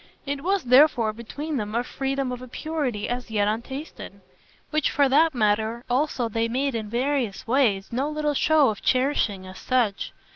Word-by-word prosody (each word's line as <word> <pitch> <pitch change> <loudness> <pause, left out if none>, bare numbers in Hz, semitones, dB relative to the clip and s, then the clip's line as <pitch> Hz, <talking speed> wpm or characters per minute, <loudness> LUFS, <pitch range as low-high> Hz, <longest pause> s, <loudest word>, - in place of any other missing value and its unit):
It 280 0 -3
was 385 +1 +1
therefore 250 -3 +5
between 285 +7 -5
them 210 -1 -4
a 240 - +1
freedom 270 0 -2
of 250 0 -5
a 255 - -9
purity 260 -6 -3
as 245 0 -4
yet 205 -2 +1
untasted; 265 +8 -5 0.5
which 310 -2 +1
for 280 -1 +3
that 300 +3 +3
matter 220 +1 +1
also 255 -2 0
they 225 +1 -1
made 265 +4 -1
in 220 -2 -4
various 245 -3 -1
ways 225 -6 +1
no 265 +5 -1
little 300 -1 -1
show 300 -1 +4
of 210 - -5
cherishing 255 -7 +1
as 185 0 -10
such. 240 -6 0
255 Hz, 175 wpm, -24 LUFS, 225-285 Hz, 0.5 s, therefore